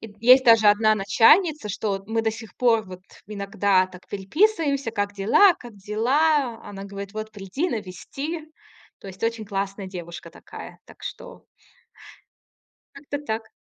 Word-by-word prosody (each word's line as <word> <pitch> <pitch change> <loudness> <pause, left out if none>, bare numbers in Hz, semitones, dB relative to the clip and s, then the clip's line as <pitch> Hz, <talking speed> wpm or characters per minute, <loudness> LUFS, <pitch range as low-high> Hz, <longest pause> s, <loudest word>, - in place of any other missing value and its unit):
Есть 230 +5 +4
даже 225 -3 +6
одна 215 +1 +4
начальница, 230 - +3
что 195 -1 -3
мы 225 +1 0
до 220 - +1
сих 220 0 -10
пор 230 -3 +3
вот 185 -1 -10 0.3
иногда 200 -2 +1
так 185 -1 -15
переписываемся. 280 - 0
"Как 205 -2 -2
дела?" 240 - +5
"Как 240 -3 -13
дела?" 245 +5 +1
Она 195 -1 -9
говорит: 200 0 -8
"Вот 215 0 -5
приди, 205 - -3
навести." 255 - -5 0.6
То - - -13
есть 190 -1 -11
очень 230 -1 -1
классная 195 0 -4
девушка 175 -2 -8
такая. - - -11
Так - - -17
что - - -9 1.5
как-то 285 0 -6
так. 220 -3 -4
215 Hz, 140 wpm, -24 LUFS, 195-250 Hz, 1.5 s, даже